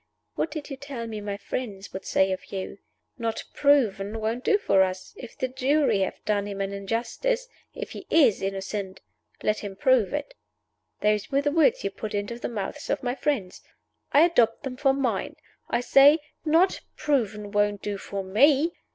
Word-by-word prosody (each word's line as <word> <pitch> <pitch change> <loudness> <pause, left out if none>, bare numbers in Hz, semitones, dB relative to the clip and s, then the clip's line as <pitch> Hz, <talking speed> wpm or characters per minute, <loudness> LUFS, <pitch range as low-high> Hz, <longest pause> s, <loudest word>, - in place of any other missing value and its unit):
"What - - -1
did 300 -1 -7
you 275 - -5
tell 270 -4 -6
me 220 -2 -5
my 205 -1 -4
friends 200 -2 -5
would 190 - -6
say 190 0 +2
of 185 - -5
you? 195 0 -5 0.4
'Not 230 -1 -2
Proven 225 -7 +2
won't 225 +3 -2
do 420 - +4
for 195 - +3
us. 185 0 -1
If 245 - -11
the 260 - -1
jury 260 -3 +2
have 190 - -3
done 205 -1 0
him 200 -1 -5
an 195 0 -2
injustice 240 - -2 0.3
if - - -6
he - - -9
is 280 -11 +4
innocent 195 0 -4 0.4
let 215 - +1
him 200 -2 -6
prove 245 -1 +3
it.' 295 +10 -4 0.7
Those 210 -1 +1
were 275 0 +1
the 290 - +1
words 315 -1 +3
you 195 - -1
put 215 +1 -5
into 205 +4 -3
the - - -3
mouths 205 -5 -5
of - - -1
my 245 0 0
friends. 250 -9 -2 0.5
I 290 - +6
adopt 300 -10 +3
them 265 -2 -4
for 270 +1 +3
mine! 275 -2 -1 0.3
I - - +1
say 275 +4 +7 0.3
Not 335 +4 +3 0.2
Proven 215 -8 -1
won't 205 -1 +1
do 205 -1 -3
for 195 0 -5
_me. 280 - +4
225 Hz, 185 wpm, -26 LUFS, 200-280 Hz, 0.7 s, say